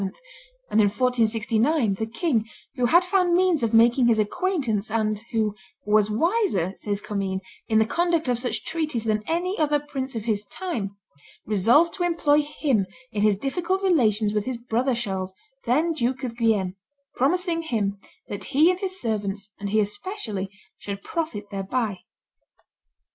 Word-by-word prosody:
and, 220 - +5
in 205 - +5
1469, 230 +2 +1
the 220 +3 -3
king, 230 -1 0 0.3
who 245 -1 +2
had 345 +7 +5
found 360 -1 +2
means 360 -4 +3
of 230 -2 +1
making 235 +2 +5
his 230 -2 +4
acquaintance, 225 - 0
and 215 -1 0
who 220 -3 +1 0.3
"was 210 0 +3
wiser," 275 - +1
says 205 -1 -3
Commynes, 195 -2 -2 0.3
"in 220 -1 +2
the 220 - +5
conduct 340 +3 +1
of 245 -2 +1
such 245 0 -2
treaties 310 -8 -2
than 215 -1 0
any 355 +4 -1
other 295 -1 +2
prince 275 -3 -5
of 220 -2 -4
his 210 -3 0
time," 220 - -4 0.5
resolved 230 - +4
to 355 - -2
employ 315 -4 +3
him 280 -9 0 0.2
in 205 - -2
his 210 -2 +4
difficult 355 - -1
relations 220 - +3
with 210 -1 0
his 255 -1 -3
brother 245 +2 0
Charles, 190 -5 -3 0.3
then 310 +8 +2
Duke 265 -2 -1
of 240 -3 -3
Guienne, 210 -6 +1 0.4
"promising 335 +5 +1
him 205 -10 -1 0.3
that 205 -1 -5
he 310 +6 +4
and 365 - -3
his 375 -1 -3
servants, 205 - -2
and 200 0 -3
he 215 +2 +2
especially, 210 - -3 0.3
should 200 -1 -6
profit 250 -12 -4
thereby." 200 +1 -2
235 Hz, 160 wpm, -25 LUFS, 210-315 Hz, 0.5 s, and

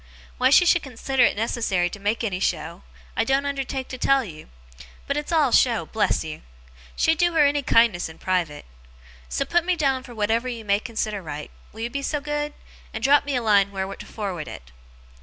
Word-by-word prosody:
Why 255 - +4
she 285 +6 +6
should 345 0 +4
consider 265 0 -2
it - - +1
necessary 210 -5 0
to 205 - -8
make 210 +4 -1
any 195 -5 -2
show, 165 0 -2 0.3
I - - +2
don't 270 +4 +1
undertake 270 -2 -3
to 255 - -7
tell 275 +1 +3
you. 155 -5 -11 0.6
But 280 - -1
it's 295 +2 -3
all 305 -6 +3
show, 235 -2 +3
bless 220 - 0
you. 155 -1 -7 0.5
She'd 320 -1 +2
do 345 -1 +3
her 310 -3 +5
any 285 0 +2
kindness 230 -9 +3
in 160 - -12
private. 175 -6 -2 0.6
So, 60 - -1
put 345 -1 +2
me 365 +1 +1
down 270 -5 +1
for 245 -2 -12
whatever 225 +3 0
you 235 -3 -5
may 200 0 +2
consider 215 -3 -3
right, 150 -3 -7 0.2
will 220 - -10
you 235 +1 -3
be 280 - -3
so 295 +2 -1
good? 295 0 -3 0.4
and 220 - -5
drop 285 +2 +5
me 285 -2 -1
a 245 - 0
line 200 -2 +4
where 195 0 -4
to - - -10
forward 190 -7 -5
it. 60 - -10
235 Hz, 210 wpm, -24 LUFS, 200-280 Hz, 0.6 s, she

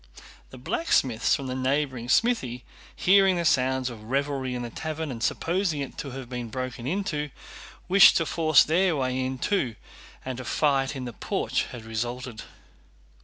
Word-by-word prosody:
The 130 - -12
blacksmiths 125 - +1
from 135 - -5
a - - -1
neighboring 130 -2 -1
smithy, 130 - +1 0.3
hearing 195 0 +4
the 170 -1 -1
sounds 130 -4 +2
of 110 -2 -11
revelry 135 0 -1
in 120 - -4
the 120 - -6
tavern 155 +1 -4
and 115 -2 -7
supposing 170 - 0
it 140 - -5
to 140 - -5
have 130 -1 -7
been 120 -2 -5
broken 130 +1 -5
into, 155 -4 -2 0.6
wished 190 +1 +7
to 165 - +1
force 155 -2 +4
their 175 +2 +2
way 130 -2 -1
in 130 0 -3
too 130 - 0 0.5
and 130 -1 -4
a - - -5
fight 135 0 +1
in 130 -1 -5
the 120 - -6
porch - - -1
had 115 -2 -10
resulted. 120 +1 -4
130 Hz, 170 wpm, -26 LUFS, 125-155 Hz, 0.6 s, wished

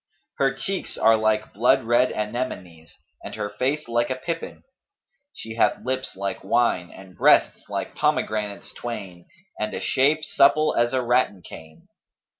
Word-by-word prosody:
Her 135 -1 +3
cheeks 190 +9 -4
are 115 - +5
like 110 0 0
blood 115 +5 +3
red 120 +2 +3
anemones 100 - -5 0.3
and - - -7
her 105 -1 -4
face 135 +8 -2
like 120 0 0
a 130 - -1
pippin: 165 +5 -6 0.7
she 110 - -9
hath - - +1
lips 130 +1 -3
like 100 0 -4
wine 95 -3 +1
and 95 -1 -14
breasts - - +3
like - - -4
pomegranates 105 -2 -1
twain 95 -7 -7 0.3
and 105 0 -2
a - - -3
shape 150 +4 +2
supple 150 +2 +4
as 120 0 +2
a 130 -1 +1
rattan 120 -6 +1
cane. 80 0 -13
115 Hz, 150 wpm, -24 LUFS, 100-130 Hz, 0.7 s, are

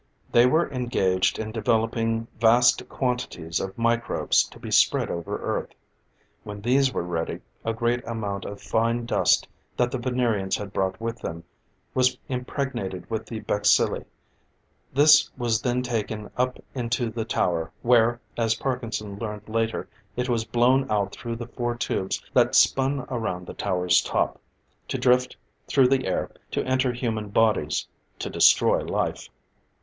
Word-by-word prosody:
They 120 +1 +6
were 160 +6 +3
engaged 95 -8 +1
in 110 0 -4
developing 115 +1 0
vast 120 +2 +4
quantities 120 -10 -2
of 95 0 -5
microbes 115 0 +2
to - - -15
be - - -7
spread - - +3
over 85 -1 -3
Earth. - - -3 0.7
When 105 0 -7
these 130 +5 +2
were - - -2
ready, 85 -2 -3 0.2
a 115 - 0
great 120 +2 0
amount 105 -4 -3
of 100 - -7
fine 115 +1 0
dust 120 - +2 0.3
that 120 0 +2
the 130 - -2
Venerians 120 -6 0
had 100 -1 -7
brought 95 0 -1
with 115 0 -4
them, 85 0 -6 0.5
was 130 0 +2
impregnated 125 - -4
with 110 -1 -3
the 110 -2 -6
bacilli. 105 0 +2 0.9
This 145 +2 +6
was 115 -3 0
then 125 +2 0
taken 110 -3 -3
up 125 0 0 0.2
into 120 -2 -1
the 115 0 -3
tower, 85 -6 -1
where, 120 0 +4 0.2
as 115 -1 +2
Parkinson 110 -6 -4
learned 105 -2 -6
later, 115 0 -1 0.3
it 125 0 -1
was 115 -3 0
blown 130 +3 +2
out 100 -2 0
through 120 +1 -5
the 120 0 -6
four 120 0 -3
tubes 95 -5 -2
that - - +3
spun 135 +1 +3
around 100 -7 -3
the - - -8
tower's 90 -2 +2
top, - - -1 0.5
to - - -2
drift 125 0 +2 0.3
through 130 -2 +4
the 130 -3 +1
air 95 - -1 0.2
to - - -2
enter 130 0 +1
human 115 -4 -3
bodies 105 -9 +1 0.3
to - - -5
destroy - - +5
life. - - -2
115 Hz, 150 wpm, -25 LUFS, 105-125 Hz, 0.9 s, They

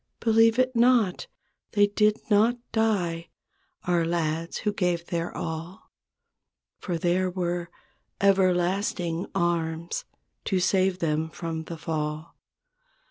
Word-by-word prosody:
Believe 225 0 +4
it 255 0 +2
not. 235 -5 +3 0.5
They 205 -2 +5
did 210 +1 +1
not 225 +3 +3
die— 180 -7 0 0.5
Our 175 -2 +1
lads 165 0 -1
who 210 -2 -1
gave 175 -4 0
their 170 -1 -3
all. 165 +3 -6 0.9
For 175 -4 -3
there 180 +2 +1
were 175 -1 -2 0.5
"Everlasting 185 -2 +1
Arms" 170 -2 -1 0.4
To 190 - +1
save 185 0 +2
them 160 -2 -1
from 160 -1 -5
the 165 - -7
fall. 155 0 -4
175 Hz, 110 wpm, -26 LUFS, 165-205 Hz, 0.9 s, They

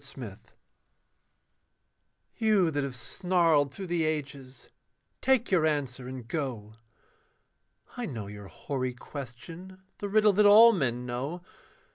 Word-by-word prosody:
THE - - -17
PESSIMIST - - -10 1.8
You 210 -7 +3
that 145 -1 -1
have 135 -2 -4
snarled 165 - +1
through 190 +7 -7
the 175 -2 0
ages, 140 -4 -5 0.5
take 260 -4 +2
your 180 -4 +3
answer 135 -4 -2
and 130 -3 -8
go 120 -8 -4 1.2
I 245 -2 -4
know 115 -8 -6
your 105 0 -9
hoary 130 +1 -4
question, 165 +10 -10 0.2
the 205 - -4
riddle 215 0 +4
that 210 +2 +4
all 225 +3 +9
men 125 - -1
know. 135 +9 -4
150 Hz, 125 wpm, -28 LUFS, 125-185 Hz, 1.8 s, all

